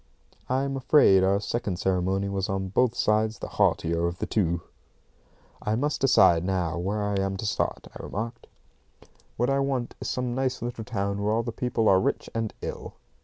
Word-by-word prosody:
I'm 135 +2 0
afraid 130 -8 +5
our 100 +1 +3
second 105 -3 -2
ceremony 95 +2 0
was 100 -1 -2
on 95 0 -2
both 120 +4 +2
sides 110 0 +1
the - - -6
heartier 85 +1 +1
of 85 +1 -4
the - - -2
two. 85 -5 0 1.0
"I 105 - 0
must 145 +6 -1
decide 90 -11 +5
now 90 -3 -1
where 100 +4 -1
I 105 -1 -1
am 95 0 -2
to 110 - -5
start," 105 - -2
I - - -7
remarked. 115 +3 -5 0.9
"What 120 +3 +1
I 135 - +2
want 135 -3 -1
is - - -3
some 125 -1 -2
nice 130 0 -1
little 120 -1 -5
town 100 -3 -2
where 105 +1 +1
all 115 +1 +1
the 115 - -3
people 115 -1 -1
are 95 - +6
rich - - -2
and 115 -1 -2
ill." - - -6
105 Hz, 185 wpm, -26 LUFS, 95-120 Hz, 1.0 s, are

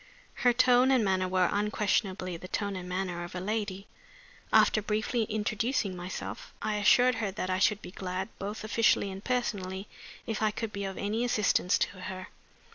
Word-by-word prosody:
Her 245 - +6
tone 250 +1 +5
and 255 -5 +4
manner 185 -1 +1
were 185 -1 +3
unquestionably 200 -3 0
the 175 +2 -8
tone 200 +1 -2
and 180 -1 -6
manner 180 -1 -2
of 175 +1 -8
a - - -2
lady. 200 0 -3 0.7
After 215 - +5
briefly 220 +2 0
introducing 215 0 -1
myself, 180 +1 -6
I 215 -1 -1
assured 245 +4 +5
her 210 - 0
that 185 -1 -3
I 185 - +1
should 210 +1 +2
be - - -8
glad, 190 0 -4
both 205 +2 -5
officially 215 -2 +2
and 190 +1 -8
personally, 200 -6 -2 0.4
if 220 -2 -3
I 215 - +3
could 215 0 -4
be 200 0 -3
of 195 -1 -5
any 215 +4 -1
assistance 210 -5 +2
to - - +1
her. 185 0 -6
200 Hz, 180 wpm, -29 LUFS, 185-220 Hz, 0.7 s, Her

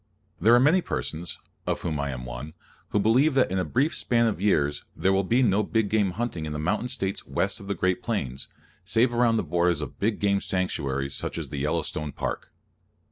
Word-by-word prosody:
There 115 +7 +6
are - - +6
many 155 +8 +4
persons, 85 - -4 0.3
of - - -1
whom 80 -4 -2
I 70 0 -1
am 60 -2 -5
one, - - -7 0.4
who 105 - +1
believe 130 +8 +3
that 130 -8 +3
in 95 - 0
a - - +1
brief 140 - +1
span 115 -1 +2
of 110 -5 -1
years 75 -8 +1
there 95 - +2
will 95 0 +2
be 120 +7 +3
no 105 -3 +3
big 105 0 0
game 105 -4 +2
hunting 95 -7 -3
in 75 - -4
the - - -3
mountain 105 +10 0
States 100 -6 -3
west - - -1
of 100 - -10
the 100 - -1
great 95 -1 0
plains, 70 - -3 0.4
save 115 +5 +2
around 120 -1 +3
the - - 0
borders 85 0 +1
of 75 -4 -7
big 105 +1 0
game 100 -1 +2
sanctuaries, 70 -7 -1
such - - -3
as - - -5
the 70 - -4
Yellowstone 75 +1 -2
Park. - - -4
95 Hz, 215 wpm, -26 LUFS, 75-115 Hz, 0.4 s, There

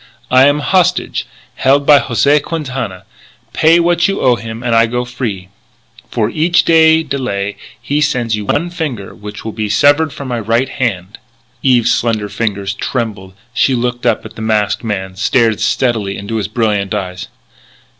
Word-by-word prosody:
I 130 +2 +6
am 145 +1 +2
hostage, 180 +1 +1 0.3
held 140 +2 +3
by 145 -1 +7
José 140 +5 +2
Quintana. 130 - -5 0.5
Pay 165 +2 +4
what 175 +1 +2
you 195 - -2
owe 125 -2 +3
him 115 +1 -7
and 120 -1 0
I 115 0 +4
go 125 +1 -2
free. 110 -7 -5 0.6
"For 110 -3 0
each 170 +2 +2
day 160 -1 +5
delay 125 -9 -3 0.2
he 140 +6 -1
sends 125 -6 0
to 105 - 0
you 105 - -6
one 170 +10 -1
finger 140 - -4
which 105 +1 -9
will 110 - -3
be 110 -1 -3
severed 145 +8 +3
from 140 -1 -8
my 120 -2 -2
right 115 +4 0
hand 105 -7 -3 0.2
" 115 - -40
Eve's 125 -4 +3
slender 110 -3 0
fingers 100 -4 -2
trembled; 105 -5 -4 0.2
she 130 +1 +2
looked 125 0 -2
up 115 -2 0
at 110 0 -10
the 110 - -8
masked 110 -1 0
man, 95 -4 -4
stared 115 0 +2
steadily 110 -2 0
into 105 +3 -4
his 105 - -2
brilliant 105 -3 -1
eyes. 90 -3 -5
120 Hz, 175 wpm, -15 LUFS, 105-140 Hz, 0.6 s, by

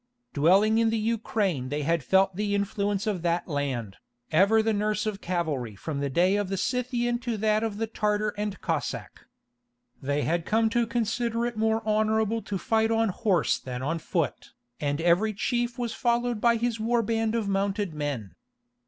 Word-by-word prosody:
Dwelling 195 +9 +4
in 230 -1 +3
the 225 - 0
Ukraine 210 - -1
they 145 +1 -2
had 165 0 +1
felt 190 +5 +3
the 205 +1 0
influence 200 0 -1
of 205 -5 -1
that 170 0 0
land, 135 - -3 0.3
ever 200 +7 +4
the 220 0 +1
nurse 210 +1 0
of 210 -2 -3
cavalry 155 - -2
from 140 +8 -4
the 140 0 -1
day 180 +8 +3
of 205 -2 -1
the 195 - -2
Scythian 240 +2 -1
to 240 -3 -3
that 215 0 +2
of 220 -2 -2
the 225 - 0
Tartar 210 -1 0
and 205 -2 -4
Cossack. - - -4 0.7
They 140 +2 0
had 170 +1 0
come 220 +4 +1
to 235 -1 +1
"consider 235 0 -1
it 240 -1 -3
more 220 0 0
honourable 220 +1 +1
to 200 - -4
fight 220 +4 +1
on 225 -1 +2
horse 190 -4 +1
than 125 0 -6
on 165 +4 -1
foot," 165 -1 -3 0.3
and 145 0 -1
every 175 +6 +3
chief 240 +3 -1
was 240 -2 -2
followed 240 -1 0
by 235 -1 +4
his 230 0 -1
war 230 +1 +1
band 225 0 0
of 225 -3 -1
mounted 200 -1 -1
men. 145 -10 -4
210 Hz, 180 wpm, -27 LUFS, 170-225 Hz, 0.7 s, Dwelling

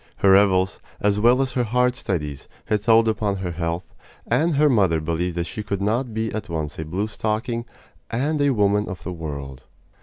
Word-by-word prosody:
Her 100 - +4
revels, 95 -1 +4 0.2
as 105 0 +1
well 120 +4 +4
as 135 - -3
her 125 0 0
hard 125 +2 +1
studies, 75 - -3 0.2
had 105 -1 0
told 115 +1 +5
upon 105 -2 0
her 95 -2 -3
health, 85 +1 -4 0.3
and 165 0 +1
her 150 +2 +4
mother 95 - +3
believed 85 +2 -2
that 85 - +1
she 90 +5 -6
could 100 -2 -3
not 115 +5 0
be 110 0 -2
at 110 -3 -5
once 80 -3 -4
a 80 - -3
blue 90 +7 -2
stocking 115 +3 -2 0.4
and 145 +6 0
a 145 - +4
woman 105 -4 +2
of 95 - -7
the 90 - -4
world. 70 -5 -7
105 Hz, 200 wpm, -23 LUFS, 85-115 Hz, 0.4 s, told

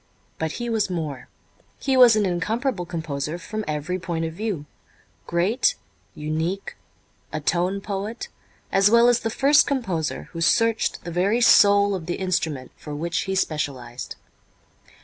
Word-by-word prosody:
But 160 -1 -2
he 240 - -4
was 225 -4 0
more. 155 -7 -4 0.5
He 270 - 0
was 245 -3 +8
an 215 -1 +2
incomparable 195 +3 -1
composer 160 -2 -4
from 215 +5 -5
every 155 +4 -2
point 165 -2 -3
of 160 - -4
view, 195 -5 -3 0.6
great, 205 - +2 0.4
unique, 160 +6 -3 0.6
a 155 - -3
tone 180 +6 0
poet, 205 +3 -4 0.4
as 195 +1 +5
well 235 +2 +6
as 240 -1 +3
the 225 - -2
first 275 +6 +4
composer 190 - -2
who 165 - -6
searched 230 +5 +2
the 175 - -6
very 195 +7 +1
soul 205 -3 +6
of 175 -4 -5
the 175 - -1
instrument 160 -8 -2
for 150 -1 -8
which 170 +3 -2
he 190 -1 -2
specialized. 135 -8 -3
180 Hz, 150 wpm, -23 LUFS, 160-215 Hz, 0.6 s, was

